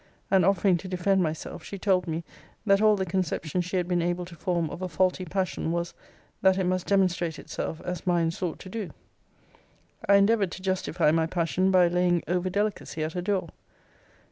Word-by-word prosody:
And 190 -1 +5
offering 190 0 +3
to 190 - -8
defend 185 +1 +1
myself, 160 0 -4
she 200 - -7
told 185 -2 +1
me, 165 +1 -3 0.4
that 195 -1 +4
all 215 -1 +5
the 190 -1 -1
conception 180 -2 -1
she 185 +2 -2
had 175 -1 0
been 175 -1 +1
able 175 +1 -1
to 175 -1 -12
form 170 0 -1
of - - -7
a 185 - -2
faulty 185 +3 +1
passion, 185 -2 -2
was, 170 0 -2 0.5
that 190 -1 +4
it 190 - +1
must 185 0 -1
demonstrate 180 -4 +1
itself 160 - -5
as 180 0 -5
mine 170 -2 +2
sought 170 -1 -4
to 185 - -9
do. 210 -3 -4 1.2
I 200 - +8
endeavoured 200 -1 +3
to 185 - -9
justify 180 -4 +1
my 160 0 +2
passion, 175 +2 0
by 185 -2 +5
laying 175 0 +2
over 180 +1 0
delicacy 200 -5 -2
at 155 +1 -3
her 180 - -2
door. 190 0 -1
180 Hz, 195 wpm, -27 LUFS, 170-190 Hz, 1.2 s, I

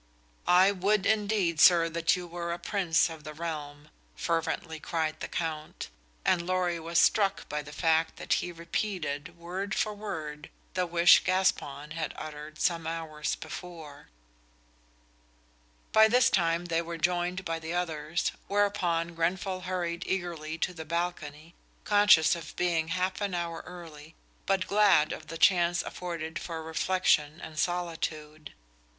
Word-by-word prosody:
"I 185 +2 +6
would 200 +1 +1
indeed, 205 -6 +1
sir, 170 -2 +7
that 165 0 +2
you 180 -1 -6
were 170 0 -5
a - - -4
Prince 175 -2 +1
of 160 -2 -9
the 155 0 -8
realm," 150 -2 -6 0.2
fervently 165 -1 -2
cried 155 -1 -2
the - - -4
Count, 155 -2 -4 0.4
and 185 -2 +3
Lorry 180 -2 0
was 165 +1 -2
struck 200 +1 +3
by 150 0 -3
the 150 0 -11
fact 160 +1 +1
that - - -1
he 175 - -5
repeated, 170 -2 -3
word 185 +4 -4
for 215 - 0
word, 160 -8 -6 0.2
the 180 -1 0
wish 170 +1 +6
Gaspon 150 -6 0
had 160 -1 -3
uttered 150 0 -8
some 165 -2 0
hours 160 -2 -3
before. 165 - -9 1.8
By 220 0 +7
this 245 +2 +4
time 170 -1 +1
they 165 -1 0
were 170 0 -6
joined 180 +2 0
by 165 -1 -2
the 165 +2 -5
others, 160 -2 -1 0.2
whereupon 185 -5 +1
Grenfall 185 +3 -1
hurried 175 -2 -2
eagerly 170 -4 -3
to 180 - -1
the 160 -2 -7
balcony, 165 -1 -4 0.3
conscious 205 -7 +5
of 170 - -9
being 170 -3 +1
half 185 +3 -1
an 200 -3 -1
hour 170 -1 -3
early, 160 -3 -11 0.3
but 195 -1 +2
glad 200 -7 +4
of 155 - -9
the 165 - -6
chance 175 0 +4
afforded 170 -2 -5
for 165 -2 -6
reflection 160 -2 +1
and 155 -1 -7
solitude. 155 -3 -3
170 Hz, 145 wpm, -29 LUFS, 160-180 Hz, 1.8 s, sir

